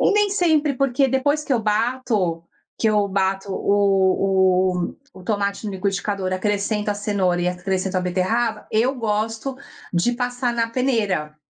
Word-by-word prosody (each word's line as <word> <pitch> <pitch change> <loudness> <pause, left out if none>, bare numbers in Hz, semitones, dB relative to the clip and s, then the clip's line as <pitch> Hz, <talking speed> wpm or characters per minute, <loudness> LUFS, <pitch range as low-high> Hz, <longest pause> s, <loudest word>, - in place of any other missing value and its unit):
E - - +4
nem 415 -1 +3
sempre 315 -7 +2
porque, 270 +1 +2
depois 285 +3 +1
que 275 - -1
eu 235 - +2
bato 215 -6 0 0.4
que 220 - +2
eu 210 -1 +2
bato 195 0 -1
o 190 -2 +2 0.2
o - - -11 0.2
o 185 - -12
tomate 200 +1 -2
no 205 - -3
liquidificador, 195 0 -2
acrescento 205 +2 -1
a - - 0
cenoura 200 -4 0
e - - 0
acrescento 185 +1 -2
a - - +2
beterraba, 190 +6 -1
eu 240 +5 +2
gosto 225 +2 -2 0.4
de 175 +8 +2
passar 245 0 -1
na 230 -1 0
peneira. 210 - -1
210 Hz, 155 wpm, -22 LUFS, 190-245 Hz, 0.4 s, E